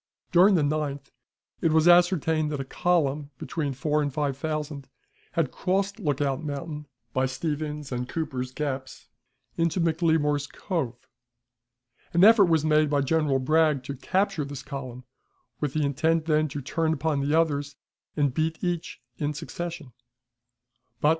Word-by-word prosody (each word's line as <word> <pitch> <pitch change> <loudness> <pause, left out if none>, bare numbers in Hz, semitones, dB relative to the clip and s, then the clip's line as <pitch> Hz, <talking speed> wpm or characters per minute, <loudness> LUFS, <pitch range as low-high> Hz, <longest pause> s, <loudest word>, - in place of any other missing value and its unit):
During 185 +3 +6
the 160 - +3
9th 145 -2 -2 0.5
it 165 - +2
was 160 +1 +4
ascertained 165 -3 +4
that 145 - -3
a 135 - -3
column, 150 -2 0
between 150 -1 -3
four 150 +3 0
and 145 -1 -1
five 140 -1 -1
thousand, 150 -1 -4 0.4
had 160 -6 0
crossed 195 +3 -1
Lookout 145 -4 -1
Mountain 150 0 -5 0.3
by 130 0 +1
Stevens's 150 +1 -4
and 125 0 -3
Cooper's 130 -6 -3
Gaps 130 -2 -5 0.5
into 170 +2 +1
McLemore's 160 -3 +1
Cove. 135 - -4 1.1
An 175 +2 +4
effort 215 -1 +8
was 160 -3 +2
made 155 -1 +3
by 145 -1 +2
General 145 -1 +2
Bragg 150 0 +2
to 140 +2 -5
capture 190 +4 0
this 140 0 -7
column, 130 -3 -7 0.6
with 150 -2 -2
intent 155 +2 +1
then 155 -1 +2
to 145 0 -5
turn 160 +3 0
upon 160 -2 0
the 145 +3 +2
others, 145 -3 -1 0.4
and 145 -3 +2
beat 160 +2 -1
each 175 -6 -3 0.2
in 150 0 -1
succession. 165 -3 -6
150 Hz, 140 wpm, -26 LUFS, 140-165 Hz, 1.1 s, effort